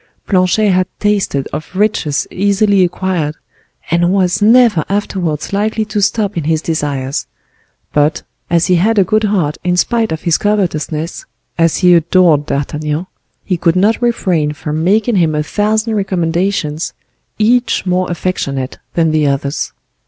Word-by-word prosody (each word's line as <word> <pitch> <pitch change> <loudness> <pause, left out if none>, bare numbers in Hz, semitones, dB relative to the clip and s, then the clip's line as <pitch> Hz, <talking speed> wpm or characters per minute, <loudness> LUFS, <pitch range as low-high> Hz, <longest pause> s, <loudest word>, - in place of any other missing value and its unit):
Planchet 195 +2 +2
had 185 0 +2
tasted 200 -10 0
of 155 +5 -6
riches 190 -8 0
easily 200 0 +2
acquired, 175 -4 -1 0.6
and 175 +1 +2
was 185 -1 +1
never 225 -6 +5
afterwards 185 -6 -2
likely 215 +2 0
to 210 -1 -2
stop 205 0 0
in 165 -4 -3
his 160 0 +1
desires; 145 -4 -3 0.7
but, 150 +1 +1 0.3
as 170 -1 +2
he 180 - +3
had 215 +6 +2
a 200 - +6
good 215 +4 +1
heart 180 -8 0
in 180 0 0
spite 225 +4 +1
of 160 - -4
his 170 -2 +2
covetousness, 170 -6 -2 0.3
as 165 -1 +3
he 180 -2 +5
adored 165 -3 +3
D'Artagnan, 150 +3 -2 0.4
he 180 - -1
could 165 0 +1
not 205 +6 +2
refrain 180 -11 0
from 150 +1 -4
making 215 +4 +2
him 160 -3 +2
a 150 - 0
thousand 215 +5 0
recommendations, 175 -4 -1 0.4
each 240 +2 +2
more 185 0 0
affectionate 140 -7 -3 0.2
than 165 -2 +2
the 155 -2 +2
others. 140 0 -2
180 Hz, 145 wpm, -15 LUFS, 155-205 Hz, 0.7 s, a